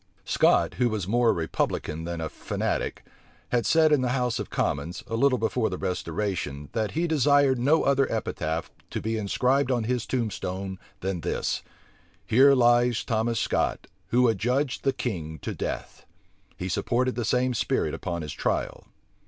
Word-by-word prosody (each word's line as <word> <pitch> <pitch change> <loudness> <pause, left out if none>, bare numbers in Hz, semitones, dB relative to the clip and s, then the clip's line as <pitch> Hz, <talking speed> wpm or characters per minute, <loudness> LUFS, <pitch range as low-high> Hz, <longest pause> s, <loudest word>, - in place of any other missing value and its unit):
Scot, - - +3
who 125 -1 +3
was 105 -5 -3
more 120 +2 +3
a - - +6
republican 80 -1 -2
than 85 -1 -4
a 80 - -2
fanatic, - - -3 0.4
had 120 -2 +1
said 160 -1 +5
in 145 -3 +4
the 125 - 0
house 125 -2 0
of - - -5
commons, 75 +5 -2
a 115 - -4
little 130 +2 +3
before 115 0 0
the 90 - -4
restoration, 85 -5 -3
that 110 -2 -2
he 165 +3 0
desired 145 -4 +3
no 145 +6 +3
other 140 -1 +2
epitaph 80 -7 -2 0.2
to - - -3
be 110 +1 -2
inscribed 125 +6 +1
on 120 -3 +1
his 125 +1 -1
tombstone 95 -5 -3 0.2
than 95 -2 -2
this: - - -1 0.6
"Here 135 +4 +6
lies 120 -1 +4
Thomas 115 0 0
Scot, - - 0 0.2
who 125 +4 +3
adjudged 125 +6 0
the 135 - +3
king 80 -12 -4
to - - -3
death." - - -5 0.5
He 90 - -4
supported 125 +6 0
the 120 - -2
same 125 +2 +1
spirit 115 - 0
upon 85 -2 -4
his 75 - -5
trial. - - -2
115 Hz, 165 wpm, -26 LUFS, 95-125 Hz, 0.6 s, a